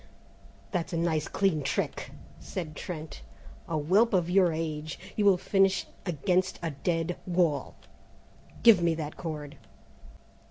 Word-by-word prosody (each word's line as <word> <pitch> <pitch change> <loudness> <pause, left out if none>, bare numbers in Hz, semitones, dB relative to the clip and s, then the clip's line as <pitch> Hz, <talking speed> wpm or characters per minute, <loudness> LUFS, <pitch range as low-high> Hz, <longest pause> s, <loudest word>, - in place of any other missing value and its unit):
"That's 180 -1 -2
a - - 0
nice 160 -2 0
clean 190 -6 +1
trick," 140 - -2 0.3
said 155 -5 -6
Trent; 160 -2 -7 0.5
"a 160 - -1
whelp 195 +10 +3
of 175 -1 +1
your 185 -2 +5
age! 155 -1 -3 0.2
You'll 200 -3 +4
finish 195 +1 +2 0.2
against 180 +3 +1
a 165 - -1
dead 165 +4 -1
wall! 170 -5 +1 0.9
Give 225 -6 +8
me 170 -1 +2
that 155 -2 -5
cord!" 150 -4 -6
170 Hz, 125 wpm, -29 LUFS, 155-185 Hz, 0.9 s, Give